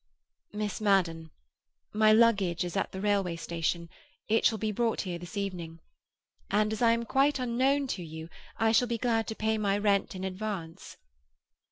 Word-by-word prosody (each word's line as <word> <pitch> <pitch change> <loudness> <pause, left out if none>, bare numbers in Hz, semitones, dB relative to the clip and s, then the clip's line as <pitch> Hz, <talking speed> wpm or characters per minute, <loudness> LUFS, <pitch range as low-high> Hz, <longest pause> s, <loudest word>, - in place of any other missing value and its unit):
"Miss 210 0 -4
Madden. 170 -6 +1 0.6
My 215 0 +5
luggage 205 -7 +3
is 175 +1 -5
at 195 - -1
the 190 - -6
railway 195 -4 0
station; 170 0 -2 0.4
it 225 +1 +2
shall 225 - +3
be 215 +1 -2
brought 230 +2 0
here 175 -3 -5
this 175 +5 -9
evening. 175 -5 -4 0.7
And, 210 +1 +1
as 220 - -5
I 230 -1 +5
am 235 0 -2
quite 275 +4 +2
unknown 260 +3 +1
to 180 - -3
you, 160 0 -8 0.3
I 225 0 +3
shall 245 +2 +3
be 235 -1 -1
glad 225 -1 0
to 220 - -4
pay 220 0 0
my 200 -1 +1
rent 200 -2 +1
in 185 - -6
advance." 190 -3 -5
205 Hz, 175 wpm, -29 LUFS, 180-225 Hz, 0.7 s, My